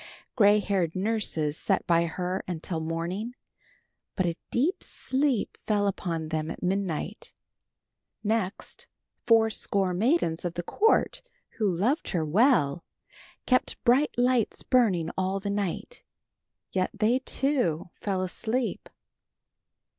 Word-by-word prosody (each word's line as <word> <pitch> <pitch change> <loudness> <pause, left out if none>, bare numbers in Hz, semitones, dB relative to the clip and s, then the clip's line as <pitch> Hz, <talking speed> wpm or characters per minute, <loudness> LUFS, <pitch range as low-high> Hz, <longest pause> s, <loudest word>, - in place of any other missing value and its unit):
Gray 210 -3 +6
haired 190 -5 0
nurses 185 -7 0
sat 195 - 0
by 170 0 +3
her 180 +3 -3
until 170 -1 -3
morning, 170 +9 -3 0.8
but 185 - +1
a 170 -1 0
deep 315 +11 +1
sleep 265 -3 -1
fell 205 -2 +2
upon 170 -5 -2
them 155 0 -2
at - - -7
midnight. 190 0 -2 0.9
Next 215 -2 -2 0.4
fourscore 220 -4 +3
maidens 200 - +1
of 175 -1 -3
the 175 - -3
court, 440 - +2 0.4
who 210 -2 +3
loved 210 - 0
her 165 -4 0
well, 175 - +3 0.6
kept 255 -1 +1
bright 260 +4 +3
lights 245 -2 +1
burning 205 -11 +2
all 190 +1 0
the 200 +1 -3
night, 200 - -3 0.7
yet 185 -1 0
they, 220 +5 +2
too, 255 - 0
fell 190 -2 -1
asleep. 230 +6 -2
195 Hz, 115 wpm, -27 LUFS, 175-235 Hz, 0.9 s, Gray